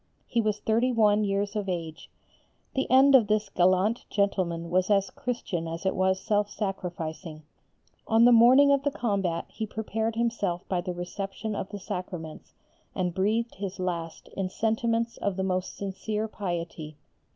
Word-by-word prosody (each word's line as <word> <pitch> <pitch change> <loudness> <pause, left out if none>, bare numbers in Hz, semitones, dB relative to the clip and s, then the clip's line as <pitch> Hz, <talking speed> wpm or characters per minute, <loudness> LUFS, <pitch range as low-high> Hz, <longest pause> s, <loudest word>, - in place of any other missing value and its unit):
He 235 - 0
was 215 -1 -1
thirty 230 +4 +1
one 215 -3 +3
years 200 +1 -1
of 205 -2 -2
age. 165 -3 -5 0.6
The 265 -2 -1
end 270 +2 +6
of 245 -6 +6
this 210 -1 +1
gallant 185 +5 +2
gentleman 180 -5 -1
was 185 +2 +2
as 195 -1 +2
Christian 195 -9 -3
as 165 +3 -6
it 190 - +2
was 190 0 +2
self 205 +1 0
sacrificing. 175 -5 -5 0.6
On 225 +1 +5
the 245 - +7
morning 255 +5 +7
of 280 -1 +3
the 285 - +1
combat 200 -10 -1
he 220 - -5
prepared 220 +1 -2
himself 215 -7 -1
by 180 -2 0
the 180 0 -4
reception 195 +4 -5
of 190 - -4
the 205 - -6
Sacraments, 180 -4 -7 0.4
and 180 -2 -1
breathed 220 +6 0
his 195 -1 -5
last 170 -3 -4
in 190 -1 -3
sentiments 230 +2 0
of 200 -2 -1
the 190 - 0
most 185 -1 -2
sincere 210 +2 -3
piety. 170 -6 -5
200 Hz, 160 wpm, -27 LUFS, 180-220 Hz, 0.6 s, the